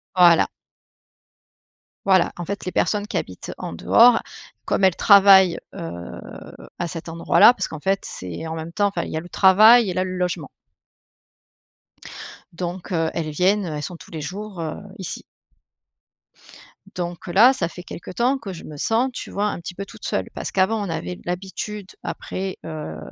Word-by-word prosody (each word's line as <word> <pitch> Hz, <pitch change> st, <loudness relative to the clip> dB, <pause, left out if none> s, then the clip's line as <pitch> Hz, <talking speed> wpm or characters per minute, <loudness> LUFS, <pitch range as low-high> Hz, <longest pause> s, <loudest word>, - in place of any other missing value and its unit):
Voilà. 175 Hz, -2 st, +6 dB, 1.6 s
Voilà, 190 Hz, -3 st, +3 dB
en 175 Hz, -, -4 dB
fait, 200 Hz, +1 st, -5 dB
les 185 Hz, -, -3 dB
personnes 210 Hz, -1 st, 0 dB
qui -, -, -3 dB
habitent, 90 Hz, -, -6 dB
heu, -, -, -4 dB
en -, -, -6 dB
dehors, 230 Hz, -, +5 dB, 0.4 s
comme -, -, 0 dB
elles 190 Hz, -3 st, +5 dB
travaillent, 195 Hz, -3 st, +7 dB, 0.2 s
heu, 85 Hz, +1 st, -7 dB, 0.6 s
à 175 Hz, -, -2 dB
cet 165 Hz, +1 st, -7 dB
endroit 165 Hz, 0 st, 0 dB
là 245 Hz, -, +9 dB
parce -, -, -3 dB
qu'en 160 Hz, -, -7 dB
fait, 195 Hz, +4 st, 0 dB
c'est 90 Hz, -, -7 dB
en 160 Hz, -, -4 dB
même 165 Hz, +1 st, -7 dB
temps 205 Hz, -1 st, +2 dB
enfin 200 Hz, -, -2 dB
il -, -, -7 dB
y 155 Hz, -, -2 dB
a -, -, -2 dB
le 175 Hz, -, -12 dB
travail 215 Hz, +5 st, +6 dB
et -, -, -2 dB
là, 185 Hz, +1 st, 0 dB
le 185 Hz, -, -4 dB
logement. 180 Hz, -5 st, -2 dB, 2.0 s
Donc, 175 Hz, +2 st, -6 dB
heu, 165 Hz, -2 st, +1 dB
elles 160 Hz, -2 st, -3 dB
viennent, 185 Hz, +6 st, +1 dB
heu, 160 Hz, -, -4 dB
elles 150 Hz, -, -4 dB
sont 175 Hz, -, -6 dB
tous -, -, -15 dB
les 160 Hz, -2 st, -5 dB
jours, 195 Hz, +2 st, -7 dB
heu, 160 Hz, -1 st, -4 dB, 0.2 s
ici. 185 Hz, -, -6 dB, 1.7 s
Donc, 175 Hz, 0 st, -5 dB
heu, -, -, -4 dB
là 230 Hz, +8 st, +7 dB
ça 170 Hz, -10 st, -2 dB
fait 180 Hz, +1 st, -10 dB
quelque 170 Hz, -, -9 dB
temps 245 Hz, +7 st, +1 dB
que 210 Hz, -6 st, -7 dB
je 170 Hz, -, -10 dB
me 155 Hz, -, -9 dB
sens, 230 Hz, -, +1 dB
tu -, -, -7 dB
vois, 205 Hz, -, -1 dB
un 205 Hz, -, -3 dB
petit 175 Hz, -, -7 dB
peu 195 Hz, +2 st, -6 dB
toute -, -, -12 dB
seule. -, -, -1 dB
Parce -, -, -5 dB
qu'avant, 205 Hz, +3 st, +1 dB
on -, -, -6 dB
avait 90 Hz, -, -4 dB
l'habitude 190 Hz, +3 st, -5 dB, 0.2 s
après, 190 Hz, 0 st, -5 dB
heu, 155 Hz, -, -6 dB
180 Hz, 190 wpm, -22 LUFS, 165-200 Hz, 2.0 s, là